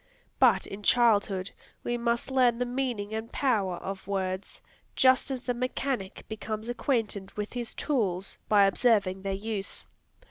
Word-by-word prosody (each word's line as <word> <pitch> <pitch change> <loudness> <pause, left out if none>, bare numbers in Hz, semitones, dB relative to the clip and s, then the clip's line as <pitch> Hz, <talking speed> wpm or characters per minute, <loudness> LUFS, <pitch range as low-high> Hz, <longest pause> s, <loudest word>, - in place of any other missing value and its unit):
But - - +5
in 195 +1 -8
childhood, 205 -4 +3 0.3
we 240 - -1
must 235 +2 -1
learn 250 -3 +4
the 250 - 0
meaning 245 -5 -2
and 220 +1 -4
power 210 -9 +1
of 190 +1 -6
words, 190 -1 -3 0.4
just 260 0 +4
as 260 -2 -3
the 245 - 0
mechanic 250 -4 -3
becomes 220 +1 -5
acquainted 225 -6 -1
with 210 0 -4
his 240 -2 -4
tools, 195 - -1
by 205 -2 +6
observing 195 -3 +2
their 195 0 -2
use. 205 -1 -4
220 Hz, 145 wpm, -28 LUFS, 195-245 Hz, 0.4 s, by